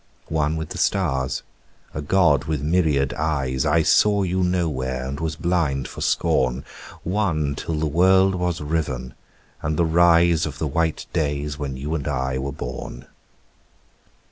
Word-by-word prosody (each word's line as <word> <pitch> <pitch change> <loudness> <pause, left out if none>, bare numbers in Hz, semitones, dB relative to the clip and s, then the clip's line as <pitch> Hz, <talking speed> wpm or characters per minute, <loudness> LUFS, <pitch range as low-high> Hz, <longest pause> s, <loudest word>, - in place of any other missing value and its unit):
One 75 0 +1
with 80 -1 -4
the - - -6
stars, 65 -1 0 0.5
a 80 - -4
god 75 -3 +3
with 75 -3 -2
myriad 75 -4 +2
eyes, 70 -5 -1
I 80 -1 +3
saw 100 +5 +4
you 95 0 0
nowhere 70 -8 -1
and 70 +2 -5
was 80 -1 -2
blind 80 -5 0
for - - -9
scorn: 65 +1 +1 0.4
One 85 -7 0
till 80 - -4
the 75 +1 -1
world 95 +5 +4
was 90 -3 -2
riven 75 -5 -2 0.5
and 75 +1 -2
the 85 - +3
rise 85 -1 +4
Of 75 - -7
the - - -2
white 80 +2 -1
days 75 -1 -1
when 70 -3 -4
you 75 +4 -4
and 75 -4 -3
I 65 -2 -1
were 70 +1 -3
born. 65 -2 -7
75 Hz, 155 wpm, -23 LUFS, 70-85 Hz, 0.5 s, saw